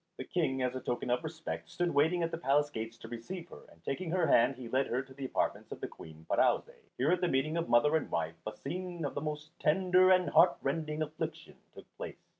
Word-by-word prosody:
The - - -4
King, 135 -7 0
as 125 0 0
a - - -2
token 120 0 -2
of 125 +5 +1
respect, 155 - -5
stood 175 - -1
waiting 160 +5 +3
at 165 - -1
the - - -3
palace 145 0 +2
gates 115 -2 -5
to 115 - -10
receive 160 +10 -7
her, - - -11
and 85 -1 -21
taking 170 +5 -3
her 180 +2 +2
hand 125 +3 +4
he 125 -2 -8
led 130 +4 +1
her 125 +3 -1
to 130 - -15
the 135 0 -6
apartments - - -1
of - - -6
the - - -3
Queen 80 0 -13
Pirouzè. - - +2 0.2
Here 140 +6 +2
at 180 0 +2
the 180 - +3
meeting 155 +2 +1
of 170 -4 -1
mother 135 +6 +5
and 160 - 0
wife 85 -1 -1
a - - -1
scene 175 +4 -5
of 140 - -3
the 145 - -3
most 150 0 -4
tender 185 +3 +4
and 185 -1 +4
heart 175 - +6
rending 155 +2 -1
affliction 155 0 -6 0.2
took - - -11
place. - - -6
150 Hz, 240 wpm, -32 LUFS, 125-170 Hz, 0.2 s, heart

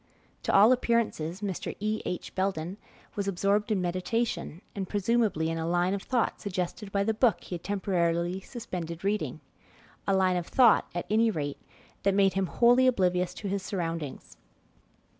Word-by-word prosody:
To - - -1
all 210 +5 +7
appearances, 230 -8 0
Mr. 195 -4 -3
E. 215 +1 -1
H. 180 - -4
Belden 185 -1 -2 0.4
was 200 -1 -2
absorbed 200 +3 +1
in 190 -4 +1
meditation, 185 0 -2
and 195 -3 -4
presumably 205 -5 +1
in 165 0 -2
a 160 - -2
line 175 +2 +1
of 200 - -2
thought 245 0 -1
suggested 195 +1 -4
by 200 0 +1
the 220 +2 +1
book 225 0 +2
be - - -14
had 175 -1 -4
temporarily 175 -3 0
suspended 180 -8 -6
reading 205 +2 -1 0.7
a 195 - +3
line 185 -1 +3
of 175 - -3
thought, 240 -5 +5
at 175 - -2
any 225 +1 +4
rate, 145 -8 -3 0.4
that 195 -1 +2
made 195 -2 +4
him 190 -1 0
wholly 245 +6 +4
oblivious 180 -6 +1
to 205 - -5
his 200 0 -1
surroundings. 165 -6 -4
195 Hz, 165 wpm, -28 LUFS, 175-210 Hz, 0.7 s, all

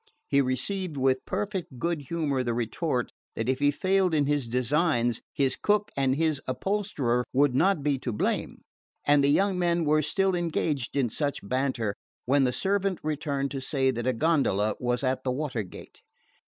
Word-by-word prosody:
He 140 - +3
received 150 - -2
with 130 -1 +2
perfect 190 -7 -3
good 170 +3 -1
humour 150 -6 0
the 120 -2 -1
retort 120 +3 -1 0.2
that 110 - -2
if 130 0 +1
he 145 0 +4
failed 185 +3 +2
in 145 -2 +3
his 145 -3 0
designs 125 0 +1
his 135 -2 +1
cook 210 0 +1
and 135 -1 +2
his 155 -2 0
upholsterer 130 - 0
would 140 0 +3
not 170 +2 +2
be 140 -2 +1
to 125 - -3
blame; 105 - -2 0.4
and 145 -1 +5
the - - +4
young 190 +5 +2
men 170 -1 +1
were 155 +1 +3
still 195 +5 +1
engaged 155 -7 -1
in 135 -3 +3
such 140 -2 -3
banter 130 -4 0 0.3
when 135 +1 +3
the 125 - +2
servant 195 +4 0
returned 145 -2 -2
to 135 - -4
say 130 -1 +1
that 120 0 -3
a 130 - +3
gondola 115 - +2
was 125 +1 -1
at 130 0 0
the 130 - -1
water 130 -3 -2
gate. 95 - -11
140 Hz, 180 wpm, -27 LUFS, 130-165 Hz, 0.4 s, and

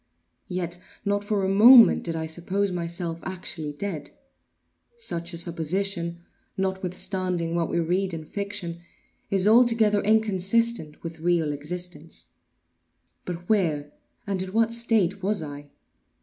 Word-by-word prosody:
Yet 175 -1 -3 0.3
not 205 0 0
for 205 -2 0
a - - +1
moment 225 +3 +8
did 165 -1 -2
I 160 0 -2
suppose 185 +5 -1
myself 170 -1 -3
actually 175 -4 -4
dead. 165 0 -4 0.9
Such 170 - -3
a 170 - -7
supposition, 170 +1 -1 0.3
notwithstanding 185 -2 -2
what 170 -1 0
we 170 - 0
read 185 +3 0
in 160 -2 -5
fiction, 200 -2 -5 0.5
is 195 0 +1
altogether 225 -2 +4
inconsistent 215 -3 +2
with 165 -1 -7
real 165 -2 +1
existence;—but 175 +2 -9
where 155 -9 +1 0.3
and 195 -2 -2
in 185 0 -6
what 225 +1 +2
state 220 -5 +1
was 200 -2 0
I? 145 -1 -8
180 Hz, 120 wpm, -25 LUFS, 170-200 Hz, 0.9 s, moment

